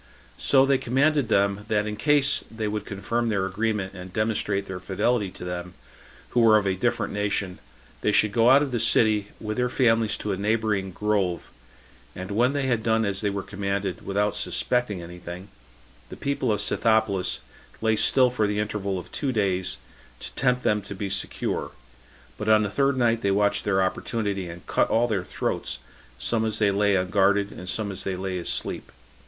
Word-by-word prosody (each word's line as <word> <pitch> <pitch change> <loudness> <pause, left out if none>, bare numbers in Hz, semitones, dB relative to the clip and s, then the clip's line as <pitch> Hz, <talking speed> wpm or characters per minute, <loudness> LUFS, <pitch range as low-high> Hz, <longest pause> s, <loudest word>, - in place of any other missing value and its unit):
So 135 -1 +4
they 135 -1 +2
commanded 140 +2 +2
them, 100 -1 +1
that 105 -1 +1
in 105 0 -3
case 145 +2 +2
they 110 -1 -4
would 105 0 -3
confirm 115 +4 -2
their 100 -3 0
agreement 100 0 -2
and 90 -1 -9
demonstrate 105 -2 -1
their 95 -1 -6
fidelity 100 +3 0
to 90 - -10
them, 90 0 -5 0.5
who 120 - +1
were 110 -2 +6
of 105 - 0
a 95 - +1
different 120 +2 -1
nation, 100 -2 -2 0.4
they 105 - +2
should 105 0 +3
go 115 +2 +4
out 140 +3 +6
of 140 - -3
the 120 - -1
city, 110 -2 +4
with 110 0 -4
their 125 0 +1
families 115 -4 +2
to 105 - -3
a 95 - -1
neighboring 105 -1 0
grove; 100 -2 -1 0.6
and 95 +2 -6
when 120 +6 +2
they 145 -1 -1
had 120 -4 +1
done 110 0 +2
as 100 -1 -2
they 105 - +1
were 100 -1 -3
commanded, 100 -2 -3
without 105 +1 0
suspecting 120 -8 -1
any 90 +1 -10
thing, 90 +3 -8 0.6
the - - -9
people 140 -4 -1
of 105 - 0
Scythopolis 105 -5 +1 0.4
lay 110 0 +2
still 125 +3 +4
for 110 -4 +1
the 105 0 -2
interval 105 -2 -2
of 90 - -8
two 140 -3 -1
days, 95 -5 0 0.4
to - - -8
tempt 125 -1 +1
them 105 0 +2
to 100 +1 -8
be 100 0 -4
secure; 95 - -2 0.7
but 105 0 -2
on 110 0 +5
the 100 - -2
third 140 +3 +1
night 115 -2 +2
they 100 - +1
watched 100 +1 +1
their 95 -2 +2
opportunity, 100 -1 -2
and 85 +1 -10
cut - - +1
all 120 +2 +3
their 105 -5 -1
throats, - - -3 0.4
some 110 - 0
as 110 -1 -1
they 105 -2 +3
lay 100 0 +2
unguarded, 100 +2 +2
and 90 - -7
some 105 +1 -1
as 95 - -5
they 95 - -2
lay 95 0 -3
asleep. 85 - -2
105 Hz, 195 wpm, -25 LUFS, 95-115 Hz, 0.7 s, were